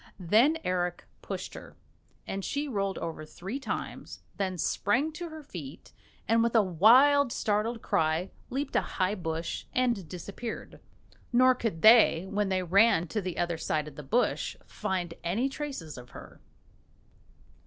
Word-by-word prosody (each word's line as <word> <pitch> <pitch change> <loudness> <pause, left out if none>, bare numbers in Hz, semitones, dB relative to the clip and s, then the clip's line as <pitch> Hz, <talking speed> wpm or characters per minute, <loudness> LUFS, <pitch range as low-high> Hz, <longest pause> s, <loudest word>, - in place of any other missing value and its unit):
Then 220 - +3
Eric 180 -1 -1 0.2
pushed - - -6
her, - - -11 0.5
and 195 0 -4
she 285 +7 -2
rolled 195 -7 -2
over 160 -2 -5
three 190 - -6
times, 270 - -6
then 190 -2 -2
sprang 245 - +1
to 340 +2 -6
her 315 -1 -9
feet, 160 - -9 0.3
and 225 +2 +4
with 235 0 +1
a 220 - +6
wild 245 - +5
startled 220 +2 -1
cry 160 +3 0 0.2
leaped 275 +3 -3
a - - +4 0.2
high 185 +1 +2
bush 165 -4 -4
and 240 -9 0
disappeared. 200 +6 -7 0.5
Nor 255 +1 +6
could 225 -9 -3
they, 220 -6 +7
when 205 0 -1
they 185 -1 0
ran 185 -1 +4
to 210 - -1
the 185 -2 -5
other 175 -2 -1
side 155 -1 -1
of 150 - -9
the 150 - -7
bush, 230 - 0
find 175 -3 -3
any 205 +10 0
traces 270 - -6
of 125 0 -13
her. - - -13
200 Hz, 155 wpm, -29 LUFS, 175-245 Hz, 0.5 s, they